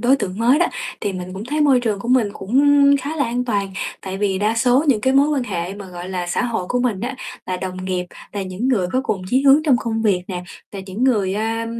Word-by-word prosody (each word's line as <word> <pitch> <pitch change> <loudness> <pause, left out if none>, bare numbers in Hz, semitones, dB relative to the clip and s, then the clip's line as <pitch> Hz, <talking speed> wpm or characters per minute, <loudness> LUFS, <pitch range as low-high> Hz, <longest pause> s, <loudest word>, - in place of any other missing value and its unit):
đối 255 +3 +4
tượng 195 -6 -4
mới 245 +5 +4
đó, 345 - +3 0.3
thì 205 -3 -2
mình 185 0 -6
cũng 195 +3 -6
thấy 300 +5 -2
môi 275 -4 +4
trường 215 -4 -1
của 235 - -6
mình 250 -4 +3
cũng 230 +9 0 0.4
khá 290 +4 -4
là 280 - +1
an 245 +1 -1
toàn, 200 -5 -1 0.3
tại 190 0 -5
vì 195 -2 0
đa 210 +2 +1
số 250 +5 +3
những 235 -6 +3
cái 260 +4 +2
mối 280 +2 +4
quan 285 -4 0
hệ 185 -4 -4
mà, 200 -1 -9
gọi 180 0 -8
là, 180 -2 -3
xã 175 - 0
hội 225 -6 -2
của 250 - 0
mình 235 -6 0
á 245 +5 -3 0.3
là 185 - -2
đồng 185 0 -5
nghiệp, 185 -1 -2 0.3
là 200 -1 -3
những 190 +7 -3
người 210 -9 +2
có 255 - +2
cùng 190 -7 -2
chí 260 +2 +3
hướng 280 +2 +6
trong 290 -5 +4
công 225 0 -2
việc 195 -5 +2
nè, 180 -1 -4 0.3
là 200 - -6
những 200 +6 -2
người, 205 -7 +2
a, 225 +2 -2
220 Hz, 265 wpm, -20 LUFS, 190-255 Hz, 0.4 s, hướng